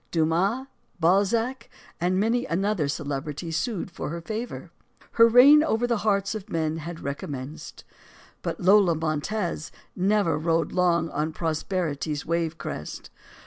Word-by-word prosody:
Dumas, 175 Hz, +10 st, +1 dB, 0.3 s
Balzac, 225 Hz, +8 st, +1 dB, 0.3 s
and 180 Hz, +2 st, +1 dB
many 230 Hz, +4 st, +1 dB
another 190 Hz, -2 st, 0 dB
celebrity 145 Hz, +3 st, -4 dB
sued 175 Hz, +4 st, -2 dB
for 170 Hz, -, -5 dB
her 170 Hz, +2 st, -4 dB
favor. 220 Hz, +7 st, -6 dB, 0.4 s
Her 230 Hz, 0 st, +6 dB
reign 275 Hz, +6 st, +8 dB
over 240 Hz, -6 st, +1 dB
the 235 Hz, -1 st, +1 dB
hearts 200 Hz, -1 st, +1 dB
of 215 Hz, -1 st, -7 dB
men 160 Hz, -3 st, -1 dB
had 165 Hz, +1 st, -7 dB
recommenced. 140 Hz, +2 st, -6 dB, 0.6 s
But -, -, -4 dB
Lola 190 Hz, -2 st, +5 dB
Montez 160 Hz, +2 st, -2 dB, 0.2 s
never 195 Hz, -4 st, +2 dB
rode 165 Hz, +1 st, 0 dB
long 170 Hz, -2 st, +2 dB
on 155 Hz, +2 st, -2 dB
prosperity's 160 Hz, -2 st, -2 dB
wave 165 Hz, -1 st, -1 dB
crest. 75 Hz, -, -7 dB
170 Hz, 130 wpm, -25 LUFS, 160-210 Hz, 0.6 s, reign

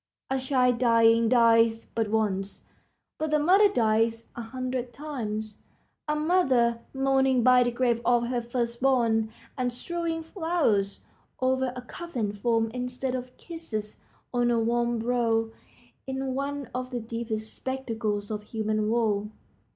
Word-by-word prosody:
A 265 Hz, -, +1 dB
child 255 Hz, -2 st, +2 dB
dying 230 Hz, -1 st, +4 dB
dies 230 Hz, -2 st, +4 dB
but 225 Hz, -1 st, -2 dB
once, 200 Hz, -3 st, -1 dB, 0.6 s
but 315 Hz, 0 st, -1 dB
the 305 Hz, -, +3 dB
mother 380 Hz, +7 st, +5 dB
dies 225 Hz, -, +1 dB
a 235 Hz, -, -5 dB
hundred 255 Hz, +1 st, -4 dB
times. 220 Hz, -7 st, -5 dB, 0.5 s
A 300 Hz, -, +1 dB
mother 265 Hz, -8 st, +2 dB
mourning 265 Hz, -2 st, +2 dB
by 250 Hz, 0 st, +6 dB
the 245 Hz, -, +3 dB
grave 240 Hz, -1 st, 0 dB
of 240 Hz, -1 st, +3 dB
her 240 Hz, 0 st, -1 dB
first 235 Hz, 0 st, -3 dB
born, 230 Hz, -4 st, +2 dB, 0.2 s
and 250 Hz, -1 st, -1 dB
strewing 330 Hz, +5 st, -3 dB
flowers 320 Hz, -, 0 dB, 0.4 s
over 260 Hz, 0 st, +1 dB
a 250 Hz, -, -7 dB
coffined 240 Hz, -9 st, -5 dB
form 225 Hz, 0 st, +1 dB
instead 250 Hz, +1 st, -3 dB
of 255 Hz, 0 st, -6 dB
kisses 235 Hz, -12 st, -6 dB, 0.4 s
on 240 Hz, -1 st, +2 dB
a 235 Hz, -1 st, +2 dB
warm 235 Hz, +1 st, +1 dB
brow, 230 Hz, -1 st, +1 dB, 0.6 s
is 265 Hz, 0 st, -3 dB
one 275 Hz, +1 st, -3 dB
of 255 Hz, 0 st, -3 dB
the 250 Hz, -2 st, -3 dB
deepest 225 Hz, -1 st, -4 dB
spectacles 225 Hz, -6 st, -3 dB
of 210 Hz, -1 st, -3 dB
human 215 Hz, -1 st, -1 dB
woe. 215 Hz, -3 st, +1 dB
240 Hz, 140 wpm, -27 LUFS, 225-260 Hz, 0.6 s, by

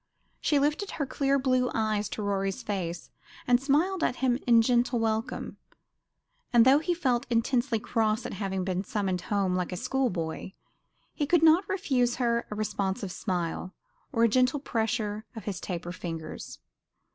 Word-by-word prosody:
She 295 Hz, -, +2 dB
lifted 300 Hz, +8 st, +1 dB
her 290 Hz, -, 0 dB
clear 275 Hz, +1 st, +1 dB
blue 255 Hz, -2 st, +2 dB
eyes 215 Hz, -2 st, 0 dB
to 215 Hz, -, -4 dB
Rorie's 195 Hz, -1 st, -1 dB
face, 180 Hz, -4 st, -4 dB, 0.3 s
and 245 Hz, 0 st, +4 dB
smiled 320 Hz, +7 st, +1 dB
at -, -, +1 dB
him 255 Hz, -1 st, +1 dB
in 230 Hz, -1 st, +6 dB
gentle 240 Hz, +1 st, +2 dB
welcome; 225 Hz, -1 st, -2 dB, 0.9 s
and 235 Hz, -1 st, +6 dB
though 270 Hz, +3 st, +6 dB
he 345 Hz, +3 st, -1 dB
felt 260 Hz, -6 st, 0 dB
intensely 240 Hz, +1 st, +1 dB
cross 220 Hz, 0 st, 0 dB
at -, -, -4 dB
having 190 Hz, -1 st, -2 dB
been 185 Hz, 0 st, -1 dB
summoned 195 Hz, -3 st, -2 dB
home 195 Hz, -1 st, 0 dB
like 180 Hz, 0 st, -2 dB
a 180 Hz, -, -3 dB
school 260 Hz, +4 st, 0 dB
boy, 170 Hz, +1 st, -4 dB, 0.6 s
he 290 Hz, -, -1 dB
could 340 Hz, +1 st, +3 dB
not 325 Hz, +4 st, +5 dB
refuse 260 Hz, -11 st, +1 dB
her 235 Hz, -2 st, 0 dB
a 210 Hz, -, -5 dB
responsive 200 Hz, -2 st, -2 dB
smile, 180 Hz, 0 st, -3 dB, 0.4 s
or 230 Hz, -4 st, +2 dB
a -, -, +7 dB
gentle 255 Hz, +5 st, +2 dB
pressure 220 Hz, -4 st, -2 dB
of 220 Hz, -, -8 dB
the 205 Hz, -, -2 dB
taper 175 Hz, -1 st, -5 dB
fingers. 165 Hz, -3 st, -6 dB
230 Hz, 165 wpm, -28 LUFS, 195-265 Hz, 0.9 s, a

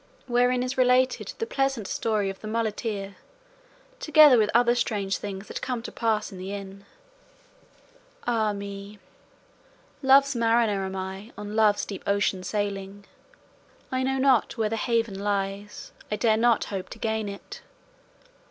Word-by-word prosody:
WHEREIN 245 Hz, 0 st, +2 dB
IS 255 Hz, +1 st, -3 dB
RELATED 255 Hz, +1 st, +2 dB
THE 455 Hz, -, -2 dB
PLEASANT 270 Hz, -, -1 dB
STORY 210 Hz, -1 st, -1 dB
OF 195 Hz, -, -12 dB
THE 215 Hz, -, -7 dB
MULETEER, 215 Hz, -3 st, -3 dB, 0.8 s
TOGETHER 305 Hz, -, +7 dB
WITH 210 Hz, -1 st, +2 dB
OTHER 240 Hz, +1 st, +4 dB
STRANGE 205 Hz, -5 st, -1 dB
THINGS 200 Hz, 0 st, -7 dB
THAT -, -, -6 dB
CAME 245 Hz, -3 st, -3 dB
TO -, -, -6 dB
PASS 220 Hz, -2 st, -1 dB
IN 190 Hz, -, -9 dB
THE 190 Hz, +2 st, -6 dB
INN 200 Hz, 0 st, -8 dB, 1.4 s
Ah 225 Hz, -3 st, +1 dB
me, 200 Hz, 0 st, -7 dB, 1.0 s
Love's 275 Hz, 0 st, +5 dB
mariner 225 Hz, -3 st, +2 dB
am 190 Hz, -, -6 dB
I 190 Hz, +4 st, -6 dB
On 210 Hz, 0 st, -6 dB
Love's 215 Hz, -2 st, +3 dB
deep 195 Hz, -, -7 dB
ocean 200 Hz, -2 st, +1 dB
sailing; 200 Hz, 0 st, -4 dB, 0.9 s
I 260 Hz, 0 st, 0 dB
know 265 Hz, +1 st, 0 dB
not 265 Hz, -3 st, +2 dB
where 220 Hz, -2 st, +1 dB
the 225 Hz, -, -1 dB
haven 225 Hz, -3 st, 0 dB
lies, 200 Hz, 0 st, -3 dB, 0.2 s
I 210 Hz, -, 0 dB
dare 220 Hz, +1 st, +3 dB
not 230 Hz, 0 st, +3 dB
hope 190 Hz, -2 st, -4 dB
to -, -, -9 dB
gain 220 Hz, -2 st, -2 dB
it. 200 Hz, 0 st, -9 dB
215 Hz, 150 wpm, -26 LUFS, 200-240 Hz, 1.4 s, TOGETHER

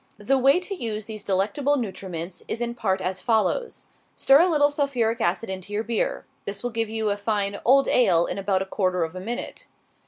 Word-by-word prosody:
The 265 Hz, +6 st, +1 dB
way 275 Hz, +6 st, +5 dB
to 365 Hz, +2 st, -5 dB
use 220 Hz, -, -3 dB
these 215 Hz, -1 st, -7 dB
delectable 260 Hz, +10 st, +1 dB
nutriments 185 Hz, -6 st, -5 dB
is 230 Hz, -, -3 dB
in 240 Hz, 0 st, -2 dB
part 195 Hz, -5 st, -1 dB
as 185 Hz, 0 st, -3 dB
follows: 230 Hz, -, 0 dB, 0.3 s
Stir 275 Hz, +1 st, +5 dB
a 345 Hz, -, +5 dB
little 290 Hz, -3 st, +3 dB
sulphuric 250 Hz, -6 st, 0 dB
acid 185 Hz, +6 st, 0 dB
into 190 Hz, +1 st, -6 dB
your 210 Hz, +2 st, 0 dB
beer. 230 Hz, -1 st, -2 dB, 0.2 s
This 200 Hz, +2 st, -5 dB
will 245 Hz, -, -2 dB
give 225 Hz, -1 st, -1 dB
you 220 Hz, -1 st, -1 dB
a 200 Hz, -, -1 dB
fine 205 Hz, -1 st, -1 dB
"old 275 Hz, +3 st, +5 dB
ale" 175 Hz, -9 st, +4 dB
in -, -, -3 dB
about 195 Hz, -1 st, 0 dB
a -, -, -9 dB
quarter 185 Hz, -2 st, 0 dB
of 160 Hz, +2 st, -5 dB
a -, -, -5 dB
minute. 230 Hz, +6 st, -5 dB
220 Hz, 210 wpm, -24 LUFS, 190-250 Hz, 0.3 s, way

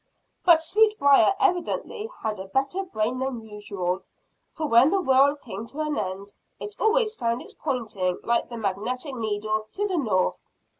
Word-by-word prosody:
But 330 Hz, -3 st, +6 dB
Sweetbriar 390 Hz, -4 st, +4 dB
evidently 410 Hz, +3 st, 0 dB
had 215 Hz, -2 st, -2 dB
a 190 Hz, -, -7 dB
better 275 Hz, -, 0 dB
brain 250 Hz, -, -2 dB
than 255 Hz, -4 st, -4 dB
usual, 195 Hz, -3 st, -3 dB, 0.5 s
for 315 Hz, -, -4 dB
when 250 Hz, 0 st, +6 dB
the 390 Hz, -, +2 dB
whirl 275 Hz, -3 st, +4 dB
came 225 Hz, -6 st, -8 dB
to 290 Hz, -, -9 dB
an 305 Hz, -1 st, -1 dB
end, 200 Hz, -1 st, -4 dB, 0.3 s
it 420 Hz, 0 st, -7 dB
always 440 Hz, 0 st, +2 dB
found 235 Hz, -, -2 dB
his -, -, -12 dB
pointing 215 Hz, -, -2 dB
like 235 Hz, 0 st, 0 dB
the 235 Hz, -, -6 dB
magnetic 230 Hz, +7 st, -3 dB
needle 215 Hz, -2 st, -2 dB
to 410 Hz, +1 st, -1 dB
the 370 Hz, -3 st, -1 dB
north. 200 Hz, -9 st, 0 dB
255 Hz, 160 wpm, -25 LUFS, 215-330 Hz, 0.5 s, But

